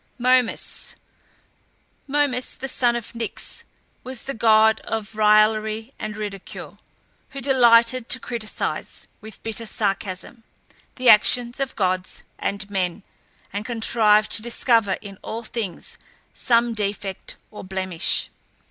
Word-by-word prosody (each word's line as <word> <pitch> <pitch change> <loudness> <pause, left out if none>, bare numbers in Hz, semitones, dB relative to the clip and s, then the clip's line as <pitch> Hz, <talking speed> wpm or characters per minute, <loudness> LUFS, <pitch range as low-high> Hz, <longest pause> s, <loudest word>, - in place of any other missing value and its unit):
MOMUS. 250 -1 +1 1.1
Momus, 275 -3 0
the 270 - -6
son 245 -2 +2
of 235 -2 -5
Nyx, 230 -2 -5 0.4
was 255 -2 -7
the 275 - -4
god 220 -1 +4
of 220 -1 -5
raillery 215 +2 +3
and 215 -1 -5
ridicule, 205 -3 -7 0.5
who 275 - -8
delighted 245 -2 +4
to 260 - +2
criticise, 230 -4 -4
with 220 -1 -12
bitter 225 0 -5
sarcasm, 200 +1 -3 0.5
the 255 -1 -2
actions 240 +3 +6
of 275 -1 -3
gods 185 -2 -1 0.2
and 200 0 -2
men, 190 -1 -2 0.5
and 205 +1 -3
contrived 220 -2 +2
to - - +7
discover 230 -3 +2
in 195 -2 -10
all 230 +1 -6
things 220 -6 -5 0.3
some 235 -1 +2
defect 200 -2 -4 0.2
or 210 - -9
blemish. 185 -2 -1
220 Hz, 120 wpm, -23 LUFS, 205-240 Hz, 1.1 s, to